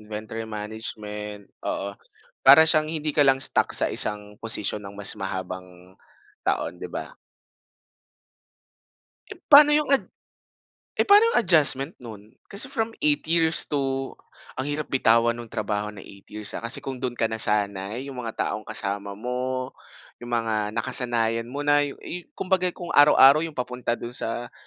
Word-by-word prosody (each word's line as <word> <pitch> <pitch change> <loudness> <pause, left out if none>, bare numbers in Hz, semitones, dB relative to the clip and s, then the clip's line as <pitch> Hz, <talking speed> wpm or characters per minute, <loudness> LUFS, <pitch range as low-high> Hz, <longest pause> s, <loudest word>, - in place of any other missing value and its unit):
inventory 110 +1 -6
management, 105 -1 -6 0.3
oo. 100 +1 -3 0.5
Para 140 +4 +9
siyang 155 -1 +2
hindi 155 -2 -3
ka 150 - +1
lang 135 -1 +3
stuck - - +1
sa - - +3
isang 105 0 -1
posisyon 105 -2 -1
ng 100 - -9
mas 105 - +2
mahabang 90 -1 -7 0.5
taon, - - -1
'di - - -6
ba? - - -7 2.2
Eh, - - -10
paano 295 +1 +8
yung 300 -1 +2
ad 275 -1 +3 0.9
eh - - -1
paano 410 +2 +8
'yong - - +4
adjustment 150 - +3
no'n? 110 +1 -12
Kasi 205 +6 -4
from 230 -4 -2
8 150 -1 +2
years 165 0 +3
to 135 -2 -2 0.5
ang 140 - -3
hirap 145 0 -4
bitawan 115 -2 +4
ng 115 - -10
trabaho 105 0 -3
na 105 -2 -10
8 100 -1 -15
years 105 -1 -6
ah. - - -5
Kasi 115 +2 -2
kung 130 -2 -6
do'n 125 -2 -3
ka - - 0
nasanay, 105 +2 0
yung 125 - -7
mga 115 -2 -6
taong 110 - -4
kasama 100 0 -4
mo, 125 +3 -4 0.5
'yong 120 - -9
mga 115 -2 -1 0.2
nakasanayan 115 -1 -1
mo 145 +3 -5
na, 145 0 +4
yu 145 -1 -3
yung 175 +1 -7
kumbaga, 185 -1 0
kung 175 - -6
araw-araw 145 0 +7
'yong 165 -2 -5
papunta 125 -1 -3
do'n 120 +1 -7
sa, 120 0 -4
120 Hz, 160 wpm, -24 LUFS, 105-145 Hz, 2.2 s, Para